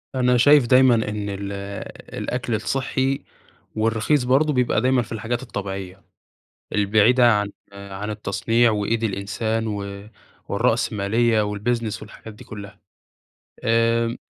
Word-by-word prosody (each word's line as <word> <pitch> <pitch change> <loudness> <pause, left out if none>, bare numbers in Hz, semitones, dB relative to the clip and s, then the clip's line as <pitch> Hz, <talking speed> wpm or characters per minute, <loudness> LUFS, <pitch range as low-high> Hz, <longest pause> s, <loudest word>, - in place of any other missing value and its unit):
أنا 125 -1 +3
شايف 145 +1 +6
دايمًا 130 -1 +6
إن 105 -2 -2
ال 100 0 -5 0.7
الأكل 120 -2 -2
الصحي 135 +3 -1 0.5
والرخيص 115 +6 +1
برضه 140 +4 +2
بيبقى 125 -4 +1
دايمًا 130 0 +3
في 115 - -9
الحاجات 115 +2 -3
الطبيعية 95 -5 -6 0.7
البعيدة 110 +4 +4
عن 105 0 0 0.2
عن 100 +1 -7
التصنيع، 115 +2 +1
وإيد 110 +2 -1
الإنسان، 110 +2 -2
و 100 -1 -5 0.4
والرأسمالية، 110 +2 +1
والبيزنس، 105 +2 -2
والحاجات 110 0 -11
دي - - -13
كلها. 100 -1 -10 0.8
آآ 115 0 +2
110 Hz, 115 wpm, -22 LUFS, 105-120 Hz, 0.8 s, شايف